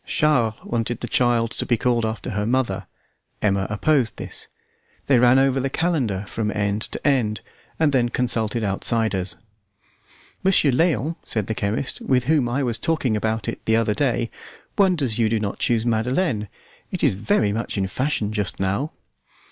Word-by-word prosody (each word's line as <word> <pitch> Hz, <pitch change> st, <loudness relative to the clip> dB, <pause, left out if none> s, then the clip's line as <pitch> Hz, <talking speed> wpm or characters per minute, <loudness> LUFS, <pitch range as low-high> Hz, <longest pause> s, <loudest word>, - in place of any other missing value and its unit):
Charles 125 Hz, -8 st, +2 dB
wanted 115 Hz, 0 st, -2 dB
the 120 Hz, -, -3 dB
child 120 Hz, -2 st, +2 dB
to -, -, -2 dB
be 120 Hz, -, +1 dB
called 120 Hz, -2 st, +1 dB
after 110 Hz, 0 st, -4 dB
her 105 Hz, +1 st, -1 dB
mother; 115 Hz, -7 st, 0 dB, 0.5 s
Emma 100 Hz, -2 st, +1 dB
opposed 120 Hz, +3 st, +1 dB
this. -, -, -7 dB, 0.6 s
They 135 Hz, -3 st, +4 dB
ran 125 Hz, +1 st, +6 dB
over 135 Hz, 0 st, +3 dB
the 135 Hz, +1 st, -1 dB
calendar 130 Hz, -, 0 dB
from 110 Hz, 0 st, -2 dB
end 105 Hz, 0 st, 0 dB
to -, -, -3 dB
end, 110 Hz, -7 st, +1 dB, 0.4 s
and 160 Hz, -2 st, +3 dB
then 120 Hz, -2 st, +3 dB
consulted 115 Hz, -2 st, 0 dB
outsiders. 100 Hz, -1 st, 0 dB, 1.1 s
"Monsieur 185 Hz, -7 st, +4 dB
Léon," 155 Hz, +1 st, +1 dB
said 110 Hz, -3 st, -2 dB
the 110 Hz, -, -2 dB
chemist, 105 Hz, +5 st, -2 dB
"with 125 Hz, -2 st, +2 dB
whom 140 Hz, -3 st, +2 dB
I 135 Hz, +4 st, 0 dB
was 120 Hz, -3 st, -2 dB
talking 155 Hz, -9 st, 0 dB
about 110 Hz, 0 st, -1 dB
it -, -, -4 dB
the 110 Hz, -, +3 dB
other 115 Hz, -2 st, +2 dB
day, 120 Hz, -1 st, 0 dB, 0.4 s
wonders 160 Hz, -, +2 dB
you 110 Hz, -2 st, +3 dB
do 110 Hz, 0 st, +1 dB
not 105 Hz, -2 st, -3 dB
chose 115 Hz, -1 st, +1 dB
Madeleine. 120 Hz, -, 0 dB, 0.4 s
It -, -, -4 dB
is -, -, +4 dB
very 105 Hz, +1 st, +1 dB
much 115 Hz, 0 st, -3 dB
in 95 Hz, -, +1 dB
fashion 110 Hz, 0 st, -1 dB
just 105 Hz, -3 st, -3 dB
now." 100 Hz, +11 st, -1 dB
115 Hz, 170 wpm, -23 LUFS, 105-130 Hz, 1.1 s, ran